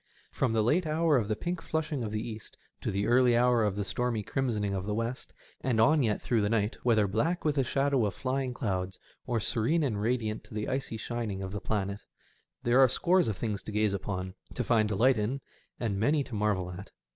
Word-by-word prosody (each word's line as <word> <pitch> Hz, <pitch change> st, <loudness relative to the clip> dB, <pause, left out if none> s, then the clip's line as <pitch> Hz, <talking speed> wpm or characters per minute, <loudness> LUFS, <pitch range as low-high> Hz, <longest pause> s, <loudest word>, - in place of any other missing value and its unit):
From 125 Hz, -4 st, 0 dB
the 110 Hz, -1 st, +2 dB
late 155 Hz, +9 st, +2 dB
hour 155 Hz, 0 st, +2 dB
of 115 Hz, -6 st, +1 dB
the 110 Hz, -, 0 dB
pink 175 Hz, +8 st, -3 dB
flashing 155 Hz, -4 st, -2 dB
of 105 Hz, -, -3 dB
the 110 Hz, +2 st, -3 dB
east 110 Hz, -2 st, -8 dB, 0.2 s
to -, -, -2 dB
the 100 Hz, +1 st, 0 dB
early 120 Hz, 0 st, +4 dB
hour 120 Hz, -1 st, +4 dB
of 105 Hz, -2 st, 0 dB
the 100 Hz, -, -1 dB
stormy 115 Hz, +1 st, -1 dB
crimsoning 105 Hz, -5 st, -1 dB
of 95 Hz, 0 st, -3 dB
the 105 Hz, -, -1 dB
west, 115 Hz, +3 st, -3 dB, 0.3 s
and 125 Hz, -4 st, +1 dB
on 150 Hz, +7 st, +5 dB
yet 110 Hz, -5 st, +1 dB
through 115 Hz, -3 st, +1 dB
the 105 Hz, -, +1 dB
night, 110 Hz, -1 st, +1 dB
whether 110 Hz, -4 st, +3 dB
black 145 Hz, -, 0 dB
with 150 Hz, -, +3 dB
the 140 Hz, -2 st, +2 dB
shadow 135 Hz, -2 st, +1 dB
of 100 Hz, -, -5 dB
flying 130 Hz, 0 st, -1 dB
cloudtf 95 Hz, -6 st, -2 dB, 0.3 s
or 120 Hz, -2 st, +1 dB
serene 125 Hz, +10 st, +1 dB
and 110 Hz, -7 st, -1 dB
radiant 110 Hz, -1 st, -1 dB
to -, -, -12 dB
the 105 Hz, 0 st, -2 dB
icy 130 Hz, -4 st, -2 dB
shining 110 Hz, -4 st, -3 dB
of 95 Hz, -, -5 dB
the 105 Hz, -, -4 dB
planet, 100 Hz, -1 st, -2 dB, 0.6 s
there 120 Hz, +2 st, +4 dB
are 130 Hz, -1 st, +7 dB
scores 180 Hz, +4 st, +3 dB
of 105 Hz, -4 st, -2 dB
things 105 Hz, -2 st, -2 dB
to -, -, -7 dB
gaze 105 Hz, -1 st, +1 dB
upon, 95 Hz, -2 st, -3 dB, 0.2 s
to 125 Hz, -, -1 dB
find 110 Hz, -2 st, +2 dB
delight 115 Hz, +4 st, +3 dB
in, 115 Hz, +6 st, -1 dB, 0.4 s
and 105 Hz, -5 st, -1 dB
many 145 Hz, +7 st, +2 dB
to 130 Hz, -, -11 dB
marvel 100 Hz, -4 st, 0 dB
at. 95 Hz, +3 st, -9 dB
115 Hz, 225 wpm, -29 LUFS, 105-130 Hz, 0.6 s, are